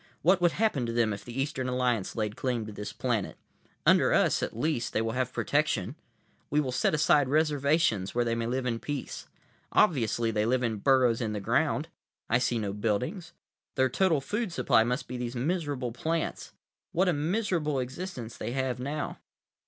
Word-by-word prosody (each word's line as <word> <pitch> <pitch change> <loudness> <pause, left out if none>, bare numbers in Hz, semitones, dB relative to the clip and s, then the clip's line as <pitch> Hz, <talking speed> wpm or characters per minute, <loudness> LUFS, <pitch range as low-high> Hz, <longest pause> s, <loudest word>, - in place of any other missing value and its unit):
What 185 +2 +4
would 175 -2 +4
happen 180 - +1
to - - -2
them 115 -2 +1
if 100 - -7
the 120 +2 -6
Eastern 130 -2 -1
Alliance 125 -5 0
laid 105 -2 -2
claim 125 -4 -2
to 110 - -7
this 105 0 -6
planet? 120 -6 -2 0.5
Under - - +5
us, - - +3
at - - -3
least, 130 -2 -1
they - - +1
will 115 - -1
have 125 +1 -1
protection. - - 0 0.6
We 150 - +2
will 135 -4 0
set 130 - +1
aside 145 -2 +4
reservations 145 - +2
where 120 0 +2
they 115 - 0
may 115 0 -1
live 125 +2 -1
in 115 -2 -1
peace. 145 0 -5 0.4
Obviously 120 - +2
they 105 0 0
live 125 +1 +1
in 115 -3 0
burrows 125 0 +3
in 110 -2 -1
the 105 - -2
ground; 100 - +1 0.4
I 120 - +4
see 125 -1 +1
no 105 -3 -2
buildings. 115 - -2 0.4
Their 130 -2 +3
total 165 0 +2
food 210 - -2
supply 125 -6 +3
must 125 +4 -2
be 125 - -5
these 120 0 -4
miserable 145 -3 -1
plants. 160 +7 -3 0.4
What 185 +3 +2
a 180 - +3
miserable 165 -2 0
existence 130 -2 -5
they 115 +3 -4
have 130 -2 -1
now! 145 +4 -4
125 Hz, 185 wpm, -29 LUFS, 115-150 Hz, 0.6 s, Under